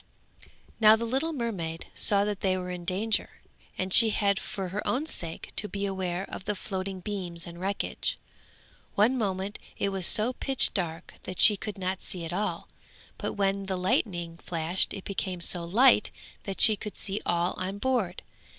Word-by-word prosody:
Now 215 -1 +8
the 230 +1 -3
little 270 +8 0
mermaid 195 - -3
saw 200 -1 +3
that 205 -2 -2
they 185 -1 +1
were 180 0 -4
in 175 -1 -6
danger, 205 +5 -1 0.4
and 185 0 -1
she 230 -1 +9
had 200 -2 +2
for 190 -2 -4
her 200 +3 -3
own 275 +5 0
sake 170 - -4
to 210 - 0
beware 190 -2 -2
of 190 - -8
the 210 - -1
floating 190 -1 -4
beams 180 -4 -4
and 170 -1 -9
wreckage. 195 +1 -2 0.8
One 220 +6 +4
moment 195 -3 -2 0.2
it 200 - 0
was 190 -2 +2
so 225 +4 +2
pitch 270 +1 +2
dark 165 -4 -3
that 185 - -5
she 210 - +8
could 205 +1 -5
not 190 0 -2
see 175 -3 -6
at 165 - -5
all, 190 -3 -2 0.5
but - - -3
when 195 -1 0
the 190 -1 -1
lightning 175 -2 -1
flashed 170 +2 -1
it 195 - -6
became 190 -2 -3
so 175 0 +1
light 215 +6 +5 0.4
that 195 -1 -5
she 215 - +8
could 210 -1 -7
see 200 0 -2
all 175 +1 +1
on 190 +2 -3
board. 215 -6 -1
195 Hz, 180 wpm, -28 LUFS, 180-210 Hz, 0.8 s, she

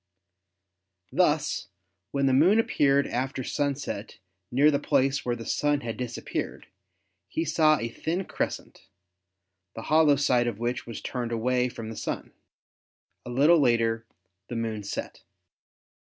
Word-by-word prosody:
Thus - - +1 0.4
when 140 -1 0
the 135 - +3
Moon 175 +11 +5
appeared 140 -10 +3
after 130 +1 -2
sunset 140 -7 -3 0.3
near 140 +5 +5
the 140 - +1
place 135 -1 +1
where 120 -1 -1
the 115 -1 -8
Sun 145 -1 +1
had 115 -1 -4
disappeared 125 -2 -4 0.6
he 160 - -2
saw 155 0 +4
a 115 - -3
thin 170 +10 -3
crescent, - - -4 0.9
the 115 - -6
hollow 155 -2 +6
side 125 -3 +2
of 115 -4 -2
which 120 +2 -3
was 115 -3 -6
turned 120 -2 -4
away 125 +2 +1
from 115 -2 -7
the - - -7
Sun. - - -4 1.0
A - - -5
little 145 +7 +5
later 115 -3 +2 0.4
the 120 - -6
Moon 115 -2 -2
set. 100 - -6
130 Hz, 140 wpm, -27 LUFS, 115-145 Hz, 1.0 s, hollow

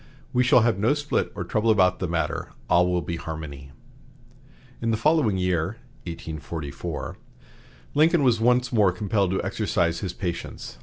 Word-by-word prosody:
We 125 - +4
shall 125 0 +5
have 115 -4 +2
no 115 +8 +3
split 145 0 -1
or - - -3
trouble 110 +1 0
about 95 -3 +4
the 90 - -1
matter; 85 0 -2 0.2
all 90 +1 +4
will 90 -1 0
be 85 - -4
harmony." 75 -4 -7 1.1
In 115 - 0
the 110 - +1
following 145 -6 +2
year 90 +2 0 0.3
(1844) 80 -2 -6 0.8
Lincoln 160 +1 +4
was 120 -4 +3
once 125 +1 +3
more 105 -5 +4
compelled 100 +1 0
to 95 - -1
exercise 95 -4 0
his 95 -3 -4
patience. 85 -4 -5
95 Hz, 155 wpm, -25 LUFS, 85-115 Hz, 1.1 s, shall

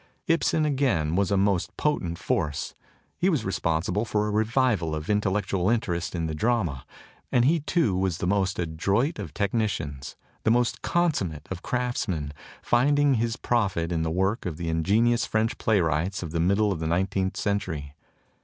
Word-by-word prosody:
Ibsen, 165 -1 +2
again, 125 - +1
was 100 0 +2
a 100 - +2
most 95 -2 0
potent 90 - -1
force; 75 -3 -2 0.5
he 185 - +3
was 150 - 0
responsible 95 +2 0
for 105 -2 0
a 105 - -1
revival 110 -6 +1
of 75 +5 -3
intellectual 100 -2 0
interest 95 -7 -1
in 85 -1 -1
the 80 - -3
drama; 85 - -1 0.4
and 120 -1 +4
he 165 +4 +3
too 150 - +1
was 95 -3 0
the - - -3
most 95 +1 +1
adroit 95 - 0
of - - -5
technicians, 100 - -2 0.3
the - - +1
most 120 0 +2
consummate 100 - 0
of 90 -1 -4
craftsmen, 105 - -2 0.4
rinding 140 +2 +4
his 115 +1 -1
profit 95 -8 0
in 85 -2 0
the 80 - -1
work 95 +6 0
of 80 -4 -4
the 85 -1 -3
ingenious 110 +9 +2
French 110 +2 0
playwrights 95 -2 +1
of 80 - -6
the 85 - -1
middle 100 +5 +2
of 90 - -2
the 80 - -2
nineteenth 95 +2 0
century. 90 -9 -2
100 Hz, 165 wpm, -26 LUFS, 85-115 Hz, 0.5 s, and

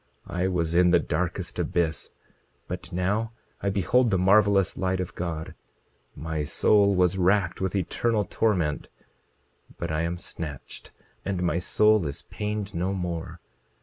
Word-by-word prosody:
I 90 +2 -1
was 85 -3 -1
in 90 +1 +5
the 85 - +6
darkest - - -2
abyss; 80 -3 -1 0.6
but - - -6
now 105 +6 -1 0.3
I 100 - 0
behold 115 +6 +2
the 95 - +2
marvelous 100 0 +4
light 95 0 -1
of 90 - -4
God. 80 -3 -4 0.6
My 80 0 -3
soul 100 +6 +3
was 90 +1 +2
racked 95 0 +2
with 95 0 -1
eternal 105 +3 0
torment; 90 -9 0 0.9
but 85 -2 -3
I 80 0 0
am 85 +1 -2
snatched, 75 -5 -8 0.3
and 95 -2 -2
my 85 -1 +1
soul 105 0 +3
is 70 - -6
pained 105 -1 -4
no 90 +3 -1
more. 85 -2 -4
90 Hz, 145 wpm, -26 LUFS, 85-100 Hz, 0.9 s, the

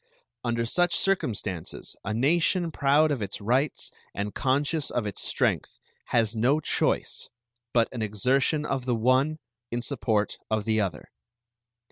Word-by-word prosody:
Under 115 -1 0
such 175 +7 +2
circumstances 105 - -1
a 105 - -3
nation 165 - +2
proud 150 +2 +3
of 135 -6 -1
its 100 -1 -3
rights 125 +8 0 0.2
and 100 +1 -3
conscious 145 +3 +1
of 120 -3 -1
its 105 - -3
strength - - 0 0.3
has 115 -1 +1
no 130 +7 +3
choice - - 0 0.4
but 115 -1 +3
an 120 - -5
exertion 130 +8 +1
of 135 -3 -2
the 125 -2 +1
one 130 +7 +2 0.3
in 120 0 -2
support 110 -6 0
of 110 -1 0
the 110 -1 +2
other. 90 -6 -4
125 Hz, 140 wpm, -27 LUFS, 110-145 Hz, 0.4 s, proud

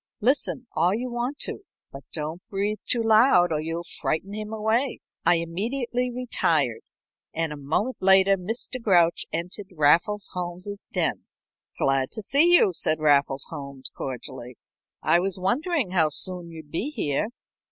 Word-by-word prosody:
Listen 260 +2 +1
all 175 +5 +2
you 245 +2 -4
want 240 +4 -3
to, - - -2 0.3
but 135 - -9
don't 160 +2 -4
breathe 205 +2 -2
too 235 -2 +1
loud 220 -6 +5
or 155 -1 0
you'll 165 +2 -4
frighten 190 +4 -3
him 215 0 -6
away." 220 +4 0 0.3
I - - +6
immediately 235 +9 -2
retired, 250 - 0 0.5
and 165 -1 -1
a - - -7
moment 160 - -2
later 190 +1 +6
Mr. 225 +7 -4
Grouch 175 -6 +3
entered 180 +4 -4
Raffles 175 +6 +2
Holmes's 180 +3 -5
den. - - -1 0.5
"Glad 135 -1 +1
to 220 -1 -5
see 290 - +4
you," 275 - +5
said 155 -1 +2
Raffles 140 -2 +3
Holmes, 140 -2 -7
cordially. 125 -1 -7 0.5
"I 170 - +4
was 190 +1 -1
wondering 255 - 0
how 165 -4 +3
soon 180 +2 +3
you'd 160 -3 -11
be 210 - -2
here." 150 - -1
185 Hz, 150 wpm, -25 LUFS, 160-230 Hz, 0.5 s, I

